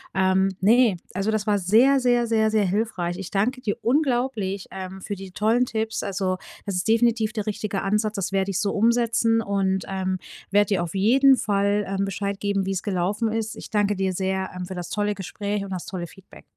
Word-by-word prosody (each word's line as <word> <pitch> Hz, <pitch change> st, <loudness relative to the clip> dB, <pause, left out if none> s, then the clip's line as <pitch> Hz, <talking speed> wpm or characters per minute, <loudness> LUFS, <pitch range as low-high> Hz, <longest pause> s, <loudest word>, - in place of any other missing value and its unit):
Ähm, 190 Hz, 0 st, +3 dB
ne, 225 Hz, -1 st, +4 dB, 0.2 s
also, 195 Hz, +3 st, -1 dB
das 215 Hz, -1 st, 0 dB
war 205 Hz, -2 st, +2 dB
sehr, 235 Hz, +9 st, +4 dB
sehr, 245 Hz, -1 st, +2 dB
sehr, 220 Hz, -1 st, +2 dB
sehr 215 Hz, -2 st, +2 dB
hilfreich. 185 Hz, -3 st, -1 dB
Ich 195 Hz, -, -6 dB
danke 245 Hz, +6 st, 0 dB
dir 205 Hz, -, -2 dB
unglaublich, 240 Hz, -7 st, 0 dB
ähm, 190 Hz, 0 st, -7 dB
für 205 Hz, -, -4 dB
die 195 Hz, 0 st, -9 dB
tollen 225 Hz, +6 st, +2 dB
Tipps. 220 Hz, -1 st, -2 dB
Also, 190 Hz, -1 st, -1 dB, 0.3 s
das 200 Hz, -3 st, -3 dB
ist 180 Hz, +4 st, -1 dB
definitiv 230 Hz, -1 st, +2 dB
der 215 Hz, -3 st, -3 dB
richtige 205 Hz, -1 st, -3 dB
Ansatz. 210 Hz, +2 st, 0 dB
Das 195 Hz, -3 st, -2 dB
werde 195 Hz, 0 st, 0 dB
ich 190 Hz, -, -1 dB
so 205 Hz, -, 0 dB
umsetzen 230 Hz, 0 st, +2 dB
und, 195 Hz, -2 st, 0 dB
ähm, 190 Hz, -1 st, -2 dB, 0.3 s
werde 205 Hz, +1 st, +3 dB
dir 190 Hz, -4 st, +1 dB
auf 170 Hz, +2 st, -6 dB
jeden 260 Hz, +7 st, +5 dB
Fall, 200 Hz, 0 st, +1 dB
ähm, 195 Hz, 0 st, -1 dB
Bescheid 200 Hz, 0 st, -3 dB
geben, 200 Hz, -1 st, 0 dB
wie 195 Hz, -, -1 dB
es 190 Hz, -1 st, -2 dB
gelaufen 205 Hz, +3 st, -1 dB
ist. 220 Hz, 0 st, -2 dB
Ich -, -, -9 dB
danke 205 Hz, -1 st, +1 dB
dir 190 Hz, -1 st, -1 dB
sehr, 190 Hz, +1 st, -1 dB
ähm, 180 Hz, 0 st, -4 dB
für 190 Hz, -, -7 dB
das 175 Hz, -1 st, -6 dB
tolle 210 Hz, 0 st, 0 dB
Gespräch 200 Hz, +1 st, -4 dB
und 200 Hz, -, -7 dB
das 185 Hz, -2 st, -4 dB
tolle 175 Hz, -3 st, -5 dB
Feedback. 190 Hz, +3 st, -16 dB
200 Hz, 210 wpm, -24 LUFS, 190-220 Hz, 0.3 s, jeden